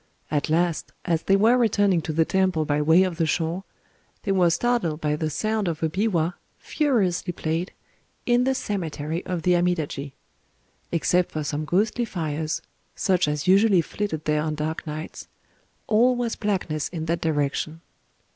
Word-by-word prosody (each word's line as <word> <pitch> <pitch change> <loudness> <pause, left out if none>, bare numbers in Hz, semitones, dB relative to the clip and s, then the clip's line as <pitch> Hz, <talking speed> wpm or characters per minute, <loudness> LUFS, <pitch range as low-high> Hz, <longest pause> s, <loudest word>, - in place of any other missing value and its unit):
At 150 0 0
last, 170 +1 0
as 165 -3 +1
they 195 - +3
were 225 +5 +4
returning 205 -6 +3
to 155 - -4
the 160 +1 +2
temple 185 -4 +1
by 145 0 +1
way 160 +5 +5
of 180 -3 -2
the 165 -2 +1
shore, 165 +4 -1 0.6
they - - -1
were 180 -3 +4
startled 175 -4 0
by 150 -2 0
the 155 +1 -2
sound 215 +5 -1
of 165 -1 -3
a 160 - +2
biwa, 180 -2 0 0.2
furiously 215 - 0
played, 165 +1 -2 0.5
in 240 0 +3
the 265 +1 +1
cemetery 165 - -3
of 180 -3 -3
the 180 - +3
Amidaji. 160 -6 -1 0.8
Except 175 +1 +1
for 155 - -3
some 150 +1 -3
ghostly 210 +8 +1
fires—such 160 +1 -2
as 150 +1 -2
usually 195 -1 +5
flitted 165 -2 -4
there 150 0 +1
on 155 0 -2
dark 155 +2 -4
nights—all 215 +9 -2
was 240 -2 -2
blackness 185 -8 -2
in 160 -3 -5
that 170 +1 -1
direction. 155 +1 -1
170 Hz, 155 wpm, -24 LUFS, 155-195 Hz, 0.8 s, way